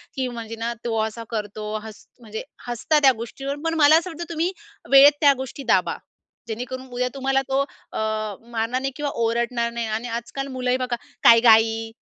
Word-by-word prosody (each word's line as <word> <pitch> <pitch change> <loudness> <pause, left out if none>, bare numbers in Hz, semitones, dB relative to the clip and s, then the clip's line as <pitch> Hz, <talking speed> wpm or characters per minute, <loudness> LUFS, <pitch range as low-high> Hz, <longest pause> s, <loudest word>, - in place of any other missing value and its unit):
की 260 -1 -1
म्हणजे 230 -2 -6
ना, 235 +1 -2
तो 225 -1 -1
असा 220 +1 -4
करतो 210 -1 -4
हस 220 -1 -11
म्हणजे 220 -2 -7 0.2
हसता 270 +6 +1
त्या 270 -2 +6
गोष्टीवर. 270 +5 -5
पण 330 - +1
मला 305 +1 +7
असं 340 +3 -2
वाटतं 340 0 -6
तुम्ही 335 +2 -1 0.4
वेळेत 275 +1 +9
त्या 285 -2 +7
गोष्टी 265 +1 -6
दाबा. 190 -7 +2 0.5
जेणेकरून 250 +3 -5
उद्या 250 +1 0
तुम्हाला 270 0 +1
तो 270 - +1
अ, 280 - -8 0.5
मारणार 230 +2 -1
नाही 270 - -2
किंवा 295 0 -2
ओरडणार 235 +1 0
नाही 235 -1 -3
आणि 220 +3 -3
आजकाल 270 +4 -6
मुलंही 255 0 0
बघा, 255 -1 -2 0.3
"काय 230 - +8
ग - - -3
आई? 225 0 +4
245 Hz, 185 wpm, -23 LUFS, 225-270 Hz, 0.5 s, वेळेत